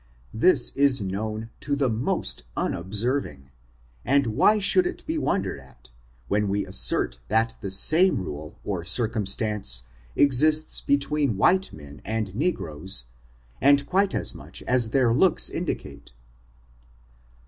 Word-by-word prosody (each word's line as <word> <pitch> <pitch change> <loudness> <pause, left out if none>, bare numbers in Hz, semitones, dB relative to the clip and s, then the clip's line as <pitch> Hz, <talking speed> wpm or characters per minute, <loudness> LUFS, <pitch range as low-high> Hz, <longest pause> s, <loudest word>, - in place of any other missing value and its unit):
This 150 +12 +2
is 140 -2 +3
known 110 +3 -5
to 145 -1 -2
the 140 -1 0
most 110 - -2
unobserving, 95 - -2 0.5
and 140 0 +2
why 120 - +3
should 355 - +2
it 360 - -8
be 320 0 -2
wondered 95 - -2
at, 65 -2 -19 0.4
when 105 +4 0
we 100 +1 -1
assert - - +1
that 110 +2 +1
the 100 - -5
same 160 - +5
rule 75 -4 -7
or 95 -5 -4
circumstance 105 - +1 0.3
exists 150 +3 +3
between 140 -4 0
white 190 - +2
men 75 -1 -13
and 110 -3 -4
negroes, 95 - -3 0.6
and 140 +1 +4
quite 195 +4 0
as - - 0
much - - -9
as 125 -3 +1
their 120 -1 +2
looks 170 +8 +3
in - - -5
dicate. - - -6
115 Hz, 130 wpm, -24 LUFS, 95-140 Hz, 0.6 s, same